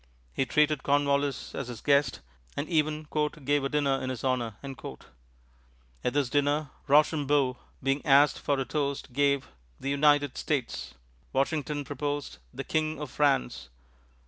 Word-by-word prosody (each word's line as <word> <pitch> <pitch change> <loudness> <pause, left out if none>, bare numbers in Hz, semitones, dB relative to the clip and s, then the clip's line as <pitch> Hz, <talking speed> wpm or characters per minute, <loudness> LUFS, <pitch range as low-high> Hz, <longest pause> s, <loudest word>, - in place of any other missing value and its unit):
He 135 - 0
treated 150 -2 +3
Cornwallis 140 0 +1
as 140 - -4
his 120 -3 -7
guest, 140 -1 +2 0.4
and 145 - -2
even 155 -2 0 0.4
"gave 145 0 +2
a 135 - 0
dinner 140 -2 +1
in 130 - -3
his 130 -2 -5
honor." 125 -5 0 1.5
At 125 - 0
this 145 -2 +2
dinner, 145 +2 +1 0.2
Rochambeau 145 -3 +3 0.3
being 135 +2 +1
asked 145 0 +5
for 140 -1 0
a 135 - -1
toast 140 -1 -2
gave 140 0 +2 0.3
"The 140 - -2
United 145 -1 +3
States." 115 - -2 0.4
Washington 145 +1 0
proposed 145 - -4
"The - - -5
King 155 -1 -1
of 150 -4 -6
France." 135 - +1
140 Hz, 140 wpm, -28 LUFS, 135-145 Hz, 1.5 s, asked